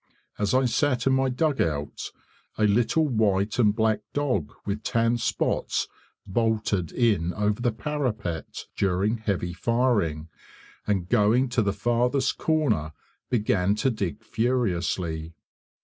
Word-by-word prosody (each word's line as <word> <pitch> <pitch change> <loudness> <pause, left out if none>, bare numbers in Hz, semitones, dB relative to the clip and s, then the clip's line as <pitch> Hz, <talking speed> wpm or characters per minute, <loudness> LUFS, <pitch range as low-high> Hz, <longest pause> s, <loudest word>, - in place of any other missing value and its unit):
As 105 +3 +1
I 130 0 +4
sat 125 0 +1
in 135 - +4
my 130 0 +2
dugout 125 - -1 0.5
a 110 - +1
little 115 +9 +3
white 110 -3 +1
and 105 -3 +4
black 110 -1 +2
dog 125 - 0
with 105 +1 -2
tan 115 +2 +1
spots - - -1 0.4
bolted 105 -4 0
in 100 -8 +1
over 105 +2 0
the 120 -1 +2
parapet, 110 - -3
during 100 +4 +1
heavy 95 -5 -2
firing, 105 -9 0 0.6
and 95 -4 0
going 120 +4 +3
to 125 -1 +1
the 100 -2 +1
farthest 125 +5 0
corner 145 - +1 0.4
began 105 -5 +1
to 130 +5 +1
dig 100 -7 -4
furiously. 90 -9 -1
110 Hz, 125 wpm, -26 LUFS, 95-125 Hz, 0.6 s, I